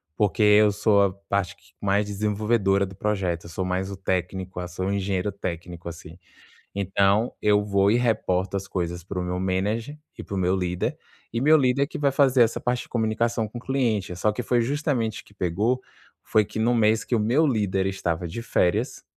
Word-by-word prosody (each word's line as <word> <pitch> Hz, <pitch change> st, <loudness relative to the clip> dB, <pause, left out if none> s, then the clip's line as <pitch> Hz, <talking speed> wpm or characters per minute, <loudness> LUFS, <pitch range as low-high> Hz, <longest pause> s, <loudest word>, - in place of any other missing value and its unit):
Porque 105 Hz, +1 st, 0 dB
eu 105 Hz, 0 st, +6 dB
sou 100 Hz, 0 st, +3 dB
a 100 Hz, -, +2 dB, 0.2 s
parte 100 Hz, -3 st, 0 dB
que -, -, -25 dB
mais 100 Hz, +1 st, +2 dB
desenvolvedora 105 Hz, -1 st, +1 dB
do 95 Hz, 0 st, -11 dB
projeto, 95 Hz, -4 st, -1 dB
eu -, -, -9 dB
sou 90 Hz, +3 st, -3 dB
mais 95 Hz, +1 st, -2 dB
o 100 Hz, -, -6 dB
técnico, 95 Hz, 0 st, -3 dB
ah, 90 Hz, -, -5 dB
sou 90 Hz, +1 st, -4 dB
um 100 Hz, -, 0 dB
engenheiro 95 Hz, 0 st, -1 dB
técnico, 85 Hz, -2 st, -6 dB
assim. 85 Hz, 0 st, -11 dB, 0.6 s
Então, 100 Hz, +3 st, +2 dB
eu 105 Hz, -1 st, +3 dB
vou 100 Hz, -1 st, +3 dB
e 115 Hz, -, +4 dB
reporto 100 Hz, -6 st, 0 dB
as 100 Hz, 0 st, -3 dB
coisas 85 Hz, -2 st, -3 dB
para 90 Hz, +1 st, -5 dB
o -, -, -2 dB
meu 90 Hz, 0 st, -3 dB
manager 105 Hz, +9 st, -1 dB, 0.2 s
e -, -, -7 dB
para 100 Hz, -, -6 dB
o -, -, -2 dB
meu 90 Hz, 0 st, +2 dB
líder, 90 Hz, -1 st, -2 dB, 0.4 s
e 115 Hz, -, -1 dB
meu 155 Hz, +3 st, +6 dB
líder 140 Hz, 0 st, +2 dB
que -, -, -7 dB
vai 140 Hz, -1 st, +2 dB
fazer 135 Hz, -2 st, +4 dB
essa 115 Hz, -, 0 dB
parte 125 Hz, 0 st, -1 dB
de -, -, -18 dB
comunicação 115 Hz, 0 st, 0 dB
com 110 Hz, -, -9 dB
o -, -, -7 dB
cliente. 115 Hz, -9 st, -1 dB
Só 105 Hz, +4 st, +1 dB
que 105 Hz, -, -4 dB
foi 120 Hz, -1 st, +2 dB
justamente 125 Hz, -4 st, -1 dB
que -, -, -21 dB
pegou, 105 Hz, +7 st, 0 dB, 0.4 s
foi 110 Hz, -1 st, +2 dB
que 110 Hz, -, -6 dB
no 120 Hz, +2 st, +2 dB
mês 110 Hz, -1 st, +3 dB
que 120 Hz, -, -1 dB
o -, -, +2 dB
meu 125 Hz, +9 st, +3 dB
líder 100 Hz, -6 st, 0 dB
estava 90 Hz, -3 st, -2 dB
de 85 Hz, +8 st, -6 dB
férias, 90 Hz, -5 st, 0 dB
100 Hz, 210 wpm, -25 LUFS, 95-115 Hz, 0.6 s, eu